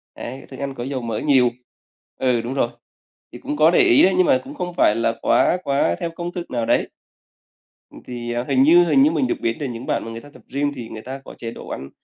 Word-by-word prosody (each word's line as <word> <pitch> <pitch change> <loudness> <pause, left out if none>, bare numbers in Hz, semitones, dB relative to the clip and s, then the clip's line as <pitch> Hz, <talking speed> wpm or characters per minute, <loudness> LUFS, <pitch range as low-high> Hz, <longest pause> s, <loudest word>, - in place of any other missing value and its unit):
đấy, 130 +3 -8
thức 130 - -10
ăn 140 -1 -3
có 120 - -5
dầu 130 0 -3
mỡ 115 -2 -3
nhiều. 130 -4 +4 0.7
Ừ, 125 -3 +2
đúng 120 +3 -4
rồi. 135 - +1 0.6
Thì - - -10
cũng 150 - -4
có 155 +2 +5
để - - +4
ý 120 - +6
đấy, 190 - +5
nhưng 185 - +5
mà 130 - +3
cũng - - -10
không 180 -1 -4
phải 105 -10 +3
là 115 0 +1
quá 180 - +3
quá 140 - +1
theo 170 - -2
công 170 +1 -5
thức 175 -1 -7
nào 120 -2 -1
đấy. - - +1 1.0
Ừm, - - -13
thì 120 -1 -5
hình 135 -1 +3
như 170 +5 +7
hình 145 -5 +4
như 150 +3 +5
mình 150 -6 0
được - - 0
biết 115 0 -1
là 145 - -2
những 120 0 -6
bạn - - -1
mà 115 - -6
người 115 0 -7
ta 145 - -14
tập - - -16
gym 145 +1 0
thì 115 -2 -7
người 110 - -8
ta 130 +4 -7
có - - -10
chế 115 -1 -5
độ - - -10
ăn, 70 +1 -6
130 Hz, 265 wpm, -21 LUFS, 120-150 Hz, 1.0 s, như